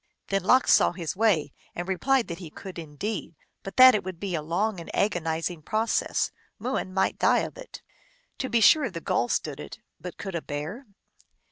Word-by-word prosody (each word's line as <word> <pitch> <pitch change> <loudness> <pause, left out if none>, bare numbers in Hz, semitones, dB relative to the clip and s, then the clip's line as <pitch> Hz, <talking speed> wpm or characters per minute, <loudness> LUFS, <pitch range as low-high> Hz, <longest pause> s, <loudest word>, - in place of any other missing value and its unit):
Then 195 0 +1
Lox 255 +7 +5
saw - - +4
his 170 -2 -4
way, 185 -9 +2 0.2
and 175 +1 -4
replied 255 +7 +1
that 170 0 -5
he 175 -4 -8
could 185 +3 -9
indeed, 165 +3 -5 0.3
but 195 - -9
that 255 0 +10
it 210 - 0
would 185 -2 -7
be 195 -3 -4
a 160 - -1
long 185 +6 -1
and 170 - -9
agonizing 165 -3 -1
process; 220 +7 0 0.3
Mooin 235 -4 -2
might 190 +1 0
die - - +4
of - - -5
it. - - -11 0.6
To 260 - -2
be 235 -1 +2
sure 285 +3 +6
the 175 -4 -6
Gull 120 - 0
stood - - -2
it, - - -8 0.2
but 180 -2 -8
could 195 -1 -6
a 170 - -2
Bear? 160 - -6
190 Hz, 195 wpm, -26 LUFS, 165-220 Hz, 0.6 s, that